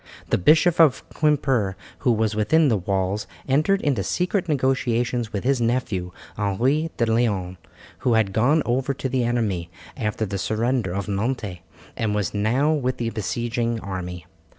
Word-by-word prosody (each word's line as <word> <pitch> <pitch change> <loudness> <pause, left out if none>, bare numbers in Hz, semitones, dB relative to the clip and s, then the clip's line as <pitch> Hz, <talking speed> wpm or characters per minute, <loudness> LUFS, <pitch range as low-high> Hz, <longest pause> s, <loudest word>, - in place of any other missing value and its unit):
The - - +3
Bishop 160 - +4
of 150 -6 +4
Quimper 135 -10 +1 0.2
who 125 - +2
was 110 -1 +1
within 145 +9 +3
the 110 - +2
walls, 95 +2 -1 0.2
entered 155 +9 +2
into 135 -9 +1
secret 180 - -1
negotiations 125 -4 0
with 100 -2 -3
his 130 -1 +1
nephew, 115 -7 -1 0.2
Henry 125 +11 +1
de 115 - +2
Leon, 105 -6 0 0.4
who 125 - +1
had 110 -4 +2
gone 140 +9 +3
over 130 +3 0
to 135 - -3
the 130 -1 0
enemy 110 -8 -1 0.3
after 110 -3 -2
the 100 -1 -4
surrender 115 0 0
of 100 +1 -3
Nantes, 105 -2 -2 0.4
and 105 -2 -1
was 105 -3 -1
now 120 +9 +2
with 130 -4 -1
the 115 -1 -2
besieging 115 +2 -2
army. 90 -3 -6
115 Hz, 155 wpm, -23 LUFS, 100-130 Hz, 0.4 s, Bishop